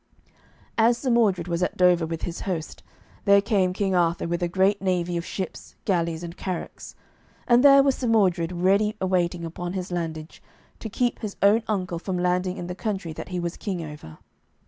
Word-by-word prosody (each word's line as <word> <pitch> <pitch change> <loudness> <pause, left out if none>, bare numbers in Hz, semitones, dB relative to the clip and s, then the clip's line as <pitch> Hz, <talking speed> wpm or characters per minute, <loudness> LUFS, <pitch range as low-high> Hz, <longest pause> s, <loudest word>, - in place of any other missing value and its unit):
As 230 +2 +4
Sir 255 0 -1
Mordred 200 -7 +2
was 170 0 -2
at 180 - -1
Dover 180 -2 +4
with 165 0 -5
his 175 0 -4
host, 170 -5 -4 0.4
there 200 0 +6
came 200 -3 +1
King 195 0 -1
Arthur 170 -1 +1
with 170 +1 -2
a 175 - +1
great 190 +3 +2
navy 180 -2 0
of 170 - -2
ships, 185 +1 -6
galleys, 170 -3 0
and 170 0 -7
carracks. 185 -3 -6 0.5
And 240 +1 +5
there 275 -1 +8
was 275 -1 +3
Sir 255 - -3
Mordred 185 -7 +2
ready 195 +4 +2
awaiting 180 -2 0
upon 175 +2 -5
his 185 -1 -4
landage, 160 -2 -5 0.4
to 220 - -6
keep 245 +3 -1
his 210 -3 -5
own 205 +3 +5
uncle 185 -5 -2
from 185 +1 -3
landing 180 +1 0
in 175 - -5
the 180 - -5
country 190 -4 -4
that - - -8
he 180 -1 -3
was 170 0 -4
king 180 -5 -4
over. 150 - -10
180 Hz, 190 wpm, -25 LUFS, 170-200 Hz, 0.5 s, there